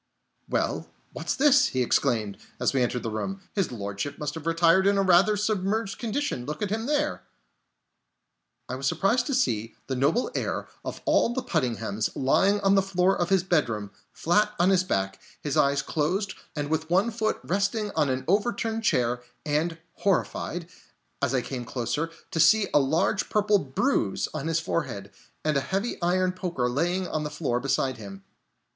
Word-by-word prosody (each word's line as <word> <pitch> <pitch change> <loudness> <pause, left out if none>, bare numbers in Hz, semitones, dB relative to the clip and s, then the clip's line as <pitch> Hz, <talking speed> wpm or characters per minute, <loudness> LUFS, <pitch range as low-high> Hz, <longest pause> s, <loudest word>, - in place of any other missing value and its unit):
"Hello, - - -1 0.3
what's - - -2
this?" 285 0 +5
he 130 -1 0
exclaimed, 115 -5 0 0.2
as - - +1
we 135 - +2
entered 125 0 0
the 115 - -3
room. 195 - -3
"His 195 -8 0
Lordship 100 +5 -4
must 150 -1 -3
have 160 -1 -7
retired 170 +3 +4
in 200 0 +3
a 195 - +3
rather 195 +3 +5
submerged 210 0 -1
condition! 235 - -2
Look 150 +8 -4
at 200 - -2
him 225 +2 -2
there!" 295 0 0 1.5
I 130 - -5
was 135 +1 -2
surprised 230 - +2
to 275 - 0
see 115 - 0
the 130 - -3
noble 140 - +1
heir - - -2 0.2
of - - -6
all 240 - +3
the 260 - -1
Puddinghams 120 - -1
lying 195 +10 +3
on 195 -1 +4
the 195 - +5
floor 190 0 +2
of 175 - -1
his 190 -2 +3
bedroom, 115 - 0 0.2
flat 210 +5 +1
on 180 +2 +4
his 185 -1 +4
back, 95 - -2 0.2
his 145 -2 -2
eyes 140 0 +3
closed, 180 +8 -1 0.2
and 145 -1 -2
with 160 0 -1
one 190 +7 +3
foot 220 -1 -1
resting 200 +3 0
on 150 -5 +1
an 130 0 -2
overturned 225 +3 0
chair; 125 - +1 0.2
and 160 +3 0 0.2
horrified, 175 -3 -1 0.5
as - - +1
I 125 - +1
came 125 0 -5
closer, 135 +7 -2 0.2
to 160 - -2
see 195 +6 +5
a - - +6
large 160 +9 +1
purple 210 -1 +3
bruise 135 - 0
on 155 0 -3
his 165 0 +1
forehead, 100 - -3 0.3
and 155 -1 +2
a - - +2
heavy 195 - -2
iron 180 +1 +2
poker 175 -9 -2
lying 175 +8 0
on 155 -2 -2
the 150 - -3
floor 150 -5 -1
beside 130 -1 0
him. 100 -3 -10
165 Hz, 175 wpm, -26 LUFS, 130-200 Hz, 1.5 s, a